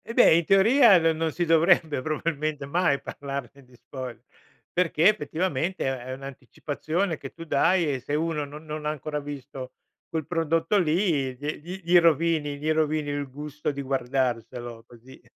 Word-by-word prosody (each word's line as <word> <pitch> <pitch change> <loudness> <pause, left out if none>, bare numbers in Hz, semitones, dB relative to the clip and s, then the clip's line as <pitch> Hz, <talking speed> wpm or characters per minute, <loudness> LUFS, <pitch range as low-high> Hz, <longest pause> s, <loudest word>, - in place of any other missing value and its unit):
Eh 230 - -6
beh, 245 - +7
in 170 0 +2
teoria 215 - +6
no 165 -1 +3
non 160 0 -1
si 175 +3 -1
dovrebbe 165 -3 +3
probabilmente 155 0 -2
mai 145 -1 +1
parlarne 140 -1 -7
di 125 -1 -21
spoiler, 130 0 -8 0.5
perché 170 -1 +3
effettivamente 175 -2 0
è 130 -1 -3
un'anticipazione 145 +6 -4
che 135 - -9
tu 165 - -9
dai 175 +3 +3
e 130 - -3
se 145 +4 -3
uno 155 -1 -1
no 145 +1 -10
non 155 0 -7
ha - - +2
ancora 150 0 -4
visto 140 -2 -8 0.4
quel 160 -2 -3
prodotto 165 +3 +1
lì, 155 -6 +1
gli 145 +3 -4
gli 180 +4 -8
gli 175 +1 +6
rovini 160 -3 +2
gli 155 +2 -1
rovini 155 -1 0
il 145 -1 -3
gusto 150 +2 -5
di 140 0 -5
guardarselo 120 -3 -2
così. 120 +2 -16
150 Hz, 165 wpm, -26 LUFS, 135-165 Hz, 0.5 s, beh